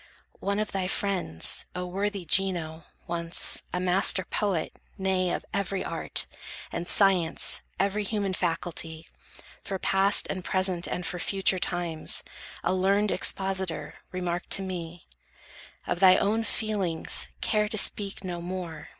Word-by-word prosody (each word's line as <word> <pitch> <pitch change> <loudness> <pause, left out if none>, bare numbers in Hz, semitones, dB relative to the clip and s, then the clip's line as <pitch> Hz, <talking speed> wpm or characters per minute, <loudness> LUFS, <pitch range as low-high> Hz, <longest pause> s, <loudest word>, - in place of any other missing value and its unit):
One 200 0 -2
of 215 0 -2
thy 190 -2 -2
friends, 185 - 0
O 180 0 -3
worthy 195 +1 -3
Gino, 165 -3 +2 0.2
once, 170 0 +3
A 180 - -2
master 185 +1 +2
poet, 190 -5 -2 0.2
nay, 190 -2 0
of - - -3
every 195 -1 -2
Art, - - -1 0.5
And 175 - -4
Science, 185 -5 +5 0.2
every 200 +2 0
human 200 -2 -2
faculty, 165 -2 -3 0.6
For 195 - -3
past, 195 +2 +2
and 185 -1 -4
present, 185 -2 +1
and 180 - -4
for 180 - -4
future 190 0 +1
times, 175 -3 0 0.4
A 180 - +1
learned 195 +2 +2
expositor, 190 -2 0 0.2
remarked 180 -1 -3
to 195 - +2
me: 175 -2 -7 0.8
"Of 175 - -2
thy 185 -1 +7
own 220 +3 0
feelings, 205 -7 -1
care 210 -1 +1
to 215 - -2
speak 200 -1 +2
no 175 -2 -5
more! 170 -3 -6
185 Hz, 135 wpm, -27 LUFS, 175-195 Hz, 0.8 s, thy